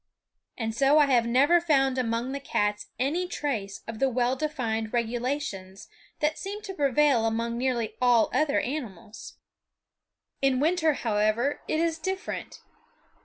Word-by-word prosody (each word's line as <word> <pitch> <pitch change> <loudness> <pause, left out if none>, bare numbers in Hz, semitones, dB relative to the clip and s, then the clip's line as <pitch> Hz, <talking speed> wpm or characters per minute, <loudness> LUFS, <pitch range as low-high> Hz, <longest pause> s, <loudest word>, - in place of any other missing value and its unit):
And 225 -2 -2
so 275 +5 +4
I 300 - +6
have 245 -4 +2
never 285 +9 +4
found 270 -5 +2
among 235 +1 -1
the 280 - -3
cats 210 -6 -1
any 305 +9 0
trace 235 - -3
of 225 -1 -6
the 270 - +3
well 250 +1 +1
defined 240 -7 -2
regulations 235 -5 -3 0.3
that 300 +1 0
seem 410 +2 -6
to 390 -3 -6
prevail 280 -6 +3
among 230 +1 -1
nearly 240 -3 -1
all 245 -2 +4
other 305 -2 +2
animals. 230 - -6 1.1
In 270 -2 +2
winter, 320 +1 +2
however, 220 +3 0
it 310 - 0
is 330 -1 0
different. 380 +4 -5
255 Hz, 140 wpm, -27 LUFS, 230-300 Hz, 1.1 s, I